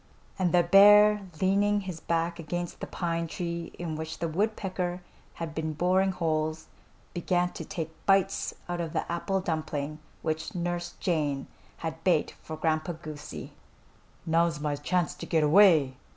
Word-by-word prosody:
And 180 Hz, -2 st, +2 dB
the 175 Hz, -1 st, +5 dB
bear, 205 Hz, +2 st, +7 dB
leaning 205 Hz, +2 st, +2 dB
his 185 Hz, -4 st, -6 dB
back 170 Hz, +1 st, -1 dB
against 175 Hz, +2 st, -4 dB
the -, -, -5 dB
pine 170 Hz, -1 st, -2 dB
tree 170 Hz, 0 st, -4 dB
in 165 Hz, -3 st, -4 dB
which 160 Hz, +1 st, -5 dB
the 170 Hz, -, -2 dB
woodpecker 185 Hz, -1 st, -2 dB, 0.3 s
had 165 Hz, -2 st, -5 dB
been 160 Hz, 0 st, -2 dB
boring 185 Hz, +4 st, +2 dB
holes, 160 Hz, -3 st, -1 dB, 0.4 s
began 180 Hz, 0 st, 0 dB
to -, -, -7 dB
take 160 Hz, -1 st, -5 dB
bites 195 Hz, 0 st, +2 dB
out 175 Hz, -1 st, -2 dB
of 165 Hz, -2 st, -4 dB
the -, -, -2 dB
apple 190 Hz, +3 st, -1 dB
dumpling 155 Hz, -3 st, -3 dB, 0.2 s
which 160 Hz, +1 st, -3 dB
Nurse 175 Hz, 0 st, -3 dB
Jane 150 Hz, -6 st, 0 dB, 0.4 s
had 160 Hz, 0 st, -5 dB
baked 170 Hz, -5 st, +2 dB
for 155 Hz, -, -7 dB
Grandpa 155 Hz, +1 st, 0 dB
Goosey. 155 Hz, -2 st, -8 dB, 0.7 s
"Now's 165 Hz, -1 st, +2 dB
my 150 Hz, -1 st, -1 dB
chance 175 Hz, +5 st, 0 dB
to -, -, -8 dB
get 160 Hz, -2 st, +2 dB
away!" 155 Hz, -5 st, +5 dB
170 Hz, 150 wpm, -28 LUFS, 155-185 Hz, 0.7 s, bear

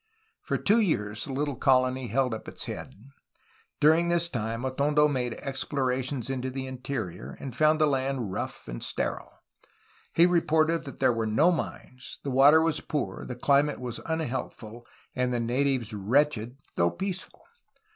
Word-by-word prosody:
For -, -, -1 dB
two 215 Hz, +3 st, +3 dB
years 105 Hz, -, 0 dB
the 140 Hz, -, -6 dB
little 140 Hz, +1 st, -1 dB
colony 130 Hz, 0 st, +2 dB
held 125 Hz, +2 st, +1 dB
up 110 Hz, -, -6 dB
its -, -, -7 dB
head. -, -, -7 dB, 0.8 s
During 160 Hz, +3 st, +4 dB
this 170 Hz, 0 st, +1 dB
time 115 Hz, -1 st, -3 dB
Atondo 145 Hz, +3 st, +3 dB
made 125 Hz, -5 st, -1 dB
explorations 130 Hz, -2 st, -2 dB
into 130 Hz, -1 st, -2 dB
the 130 Hz, 0 st, -4 dB
interior, 125 Hz, -, -5 dB
and 130 Hz, -4 st, -6 dB
found 155 Hz, +2 st, +4 dB
the 155 Hz, -, +5 dB
land 135 Hz, -6 st, -1 dB
rough -, -, -5 dB
and -, -, -6 dB
sterile. -, -, -2 dB, 0.8 s
He 170 Hz, -, +5 dB
reported 165 Hz, -2 st, +2 dB
that 135 Hz, -, -8 dB
there 125 Hz, -, +3 dB
were 115 Hz, -1 st, -1 dB
no 150 Hz, +12 st, +4 dB
mines, 130 Hz, -6 st, -5 dB
the 140 Hz, -, -3 dB
water 145 Hz, +5 st, +6 dB
was 165 Hz, -1 st, 0 dB
poor, 150 Hz, -2 st, -3 dB
the 125 Hz, -, -5 dB
climate 140 Hz, +3 st, +2 dB, 0.3 s
unhealthful, 120 Hz, -7 st, -4 dB, 0.3 s
and 125 Hz, 0 st, 0 dB
the 120 Hz, -, 0 dB
natives 125 Hz, -1 st, 0 dB
wretched 120 Hz, +3 st, +1 dB, 0.2 s
though 85 Hz, -, +3 dB
peaceful. 190 Hz, -, -5 dB
130 Hz, 155 wpm, -28 LUFS, 120-150 Hz, 0.8 s, water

